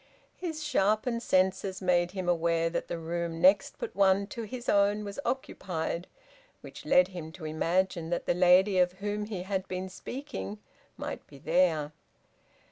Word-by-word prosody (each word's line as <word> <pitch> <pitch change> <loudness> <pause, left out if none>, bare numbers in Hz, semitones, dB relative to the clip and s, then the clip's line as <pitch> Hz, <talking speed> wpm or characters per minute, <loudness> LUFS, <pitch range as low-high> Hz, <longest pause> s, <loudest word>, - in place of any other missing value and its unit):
His 320 -4 -5
sharpened 230 -3 +1
senses 190 -1 +1
made 175 -2 +2
him 185 -1 -5
aware 165 -1 +2
that - - -2
the - - -3
room 165 0 -3
next 280 - +4
but 475 - -6
one 195 0 +4
to 235 - -5
his 240 +3 -7
own 205 +1 +3
was 200 +6 -6
occupied, 175 -8 -3 0.5
which - - -11
led 180 +1 +5
him 170 -4 -7
to 165 -3 -9
imagine 170 +2 0
that 175 - -2
the - - +2
lady 185 +2 +5
of 180 0 +3
whom 205 +2 -3
he 200 -4 -5
had 190 0 -2
been 185 +1 -4
speaking 145 - -6 0.4
might - - -6
be 140 - -14
there. 160 -1 +2
185 Hz, 160 wpm, -29 LUFS, 170-205 Hz, 0.5 s, led